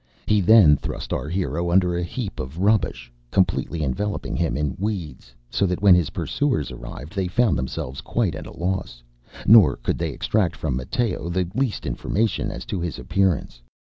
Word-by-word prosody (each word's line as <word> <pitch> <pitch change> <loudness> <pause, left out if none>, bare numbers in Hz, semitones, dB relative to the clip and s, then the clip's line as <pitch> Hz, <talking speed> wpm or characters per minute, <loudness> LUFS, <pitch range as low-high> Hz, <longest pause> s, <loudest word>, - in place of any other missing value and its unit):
He 105 -1 +3
then 90 -7 +7
thrust - - -5
our 70 +4 -3
hero 85 -1 -1
under 90 0 +3
a 85 - -1
heap 100 +3 -5
of 65 +5 -6
rubbish, 100 - 0 0.2
completely 90 -2 0
enveloping 100 +10 -2
him 85 -3 0
in 75 -2 -1
weeds; 90 - -4 0.2
so 100 - +1
that 90 +2 -3
when 100 -2 +8
his 90 -4 +3
pursuers 135 - -1
arrived 65 +6 -9
they 95 -3 -1
found 110 -1 +2
themselves 65 0 -4
quite - - -1
at - - -7
a - - -12
loss, 90 -9 -3 0.4
nor 100 - +7
could - - -3
they - - -1
extract 95 -6 0
from 70 -5 -2
Matteo 90 - -2
the 90 0 0
least 130 -3 -1
information 110 +3 -1
as - - -7
to 95 - -3
his 85 -2 -3
appearance. 90 -10 0
90 Hz, 175 wpm, -23 LUFS, 75-100 Hz, 0.4 s, when